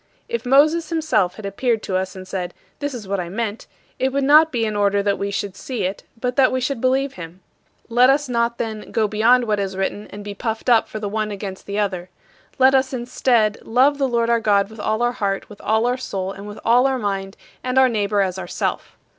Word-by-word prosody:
If 235 +1 -4
Moses 305 +5 +4
himself 255 - +1
had 215 - -9
appeared 220 +3 -1
to 190 - -3
us 190 +1 -2
and 185 0 -9
said, 180 -2 -4 0.2
"This 285 -2 -3
is 215 -5 -8
what 200 0 -1
I 175 -1 -4
meant," 215 +2 -4 0.3
it 265 +1 +1
would 280 +1 0
not 305 +3 +6
be 230 -3 0
in 215 -1 -2
order 200 0 +2
that 200 -1 0
we 200 - -2
should 200 -1 -3
see 250 +4 -4
it 190 +2 -2 0.2
but 250 +1 -2
that 265 -2 +5
we 255 - 0
should 255 -1 -2
believe 265 +2 +1
him. 170 +1 -10 0.5
Let 245 +2 +5
us 290 +1 +2
not, 235 -1 0
then, 220 -2 -5
"go 220 -2 +1
beyond 225 +4 +4
what 210 -2 0
is 195 -1 -3
written 200 +2 -2
and 205 0 -9
be 205 0 -6
puffed 225 +3 -3
up 230 -2 +4
for - - -7
the 210 - -3
one 215 +1 -2
against 195 -2 -7
the 200 0 -3
other." 185 -4 -2 0.5
Let 265 0 +5
us, 265 0 +2
instead, 240 -3 +1
"love 270 +5 +2
the 270 - +2
Lord 235 -1 +1
our 235 - +3
God 205 -2 +2
with 220 - -12
all 220 +3 0
our 240 - +2
heart, 200 -4 -2
with 210 - -13
all 220 +2 +1
our 245 +1 +1
soul, 195 -7 -4
and 200 +1 -9
with 205 - -8
all 245 +3 +5
our 265 -1 0
mind, 195 -3 -3 0.3
and 255 +1 -2
our 265 0 +7
neighbor 205 -3 0
as 190 -1 -1
ourself." - - -4
220 Hz, 240 wpm, -21 LUFS, 200-255 Hz, 0.5 s, our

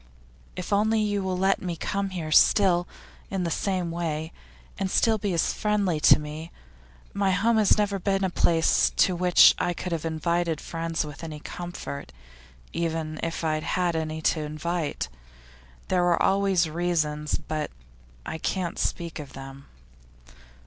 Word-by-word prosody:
If 180 +2 -4
only 220 +2 +3
you 205 -1 0
will 185 -1 -2
let 195 +1 +2
me 175 -2 -3
come 195 +4 -2
here 170 -4 -5
still, 175 +1 +5 0.4
in 190 -2 -2
the 170 - -1
same 180 -1 -1
way, 160 -1 -3 0.5
and 195 -1 -1
still 220 +2 +2
be 200 -1 -1
as 170 -2 +1
friendly 205 -6 0
to - - +7
me. 155 +2 -7 0.6
My 200 -1 +1
home 215 +5 +2
has 215 -1 +4
never 205 -1 0
been 195 +1 0
a 190 - 0
place 165 -2 +3
to 185 - +3
which 180 0 +6
I 175 0 0
could 180 - -5
have 165 -2 -2
invited 165 0 -1
friends 165 -1 -3
with 150 +1 -9
any 155 -2 -6
comfort, 175 - -7 0.6
even 160 -2 -2
if 165 0 -3
I 160 -1 +1
had 155 0 -2
had 175 -2 0
any 160 0 -3
to 160 - +2
invite. 155 - -3 0.8
There 180 - +2
were 175 -1 +3
always 195 -3 +2
reasons 155 -2 -1
but 155 -1 -4 0.6
I 160 - -5
can't 180 +1 -2
speak 170 -1 -2
of 145 -2 -9
them. 135 +1 -10
170 Hz, 160 wpm, -26 LUFS, 155-190 Hz, 0.8 s, to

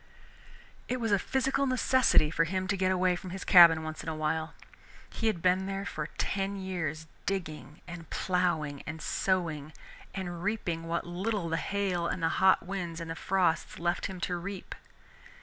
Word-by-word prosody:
It 255 - -1
was 225 -2 -1
a 200 - +4
physical 270 +5 0
necessity 255 -10 +4
for 165 0 +2
him 185 +2 -2
to 200 - +2
get 185 -1 +1
away 185 -1 +2
from 185 +1 -7
his 190 +1 -6
cabin 170 -3 +8
once 155 0 -5
in - - -5
a 160 - -3
while. 155 +1 -2 0.5
He 225 - -2
had 195 -7 -1
been 185 +1 +3
there 195 0 -3
for 155 -6 -4
ten 195 0 -1
years, 170 -5 -3 0.2
digging 155 -5 -4
and 170 -2 -9
plowing 160 -6 0
and 160 +2 -5
sowing, 160 -4 -1 0.4
and 175 -3 -4
reaping 175 -6 -2
what 170 +1 -1
little 180 +1 -2
the 165 - 0
hail 185 -2 -1
and 175 - -3
the 165 - +3
hot 190 -2 +5
winds 175 -3 -4
and 165 -1 -5
the - - -4
frosts 180 -2 0
left 175 +1 -1
him 190 -2 -7
to 175 +1 -1
reap. 190 +2 -6
180 Hz, 180 wpm, -30 LUFS, 165-195 Hz, 0.5 s, cabin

